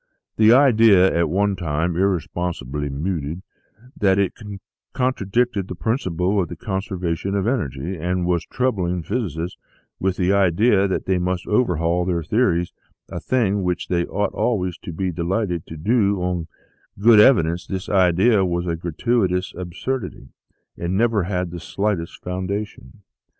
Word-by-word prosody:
The 110 0 +5
idea, 115 -8 +5
at 85 -2 +2
one 100 +3 +1
time 85 -1 -1
irresponsibly 85 -6 -2
mooted, 80 +3 -3 0.5
that 95 -2 +2
it 100 -2 +1 0.6
contradicted 120 -4 0
the 90 - -6
principle 95 -3 0
of 85 - -3
the - - -6
conservation 95 -2 -3
of 100 -1 0
energy, 90 - -2
and 90 +2 -1
was 90 -1 +1
troubling 95 -10 -1
physicists 90 - -3 0.4
with 95 -1 -1
the 95 +1 +2
idea 100 +2 +3
that 95 - -2
they 95 -1 +1
must 90 0 -2
overhaul 90 -6 +1
their 85 -2 -1
theories 90 -3 +1 0.4
a - - -5
thing 105 -6 0
which 90 -1 -2
they 85 -1 0
ought 105 +1 -1
always 95 -7 -1
to - - -8
be 90 +3 -2
delighted 90 +1 -2
to 80 - -8
do 100 +2 +1
on 90 -2 -2 0.5
good 110 +2 +6
evidence 90 -8 +4
this 95 -1 -4
idea 95 +3 +3
was 85 -1 -1
a 85 -1 -1
gratuitous 90 +3 -1
absurdity, 95 +6 -5 0.5
and 85 +2 -1
never 110 -4 +2
had 90 -2 -2
the 85 - -6
slightest 95 -1 -3
founda 95 +3 -2
tion. 105 0 -18
95 Hz, 145 wpm, -22 LUFS, 85-105 Hz, 0.6 s, good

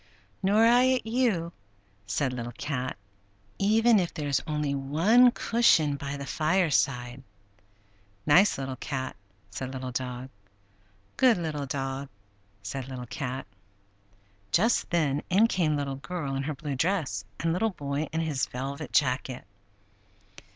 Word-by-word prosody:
"Nor 205 +3 +4
I 250 +2 +5
at 255 -3 -1
you," 220 -8 0 0.5
said 125 +6 0
Little 120 -1 -5
Cat, 130 -5 -3 0.6
"even 220 +2 +4
if 175 -2 -1
there 150 -2 -4
is 140 - +1
only 150 -2 -1
one 165 - +4
cushion 205 -12 +3
by 140 0 -5
the 140 - -6
fireside." 140 -7 +1 1.0
"Nice 180 +8 +5
Little 135 -1 -4
Cat!" 130 0 -4 0.4
said 130 +6 -5
Little 130 -1 -5
Dog. 125 0 -4 0.9
"Good 255 -5 +5
Little 155 -4 -3
Dog!" 135 0 -3 0.5
said 130 +6 -5
Little 130 -2 -6
Cat. 130 +2 -5 1.1
Just 225 - +2
then 150 -4 +1
in 195 +5 +5
came 165 -9 +1
Little 140 -2 -3
Girl 145 -1 -4
in 135 - -1
her 150 +2 -3
blue 145 0 -5
dress 140 - 0 0.2
and 165 0 0
Little 225 +6 +1
Boy 145 -4 -3
in 160 - -1
his 150 -5 -1
velvet 135 +1 -5
jacket. 130 0 0
145 Hz, 135 wpm, -28 LUFS, 130-180 Hz, 1.1 s, I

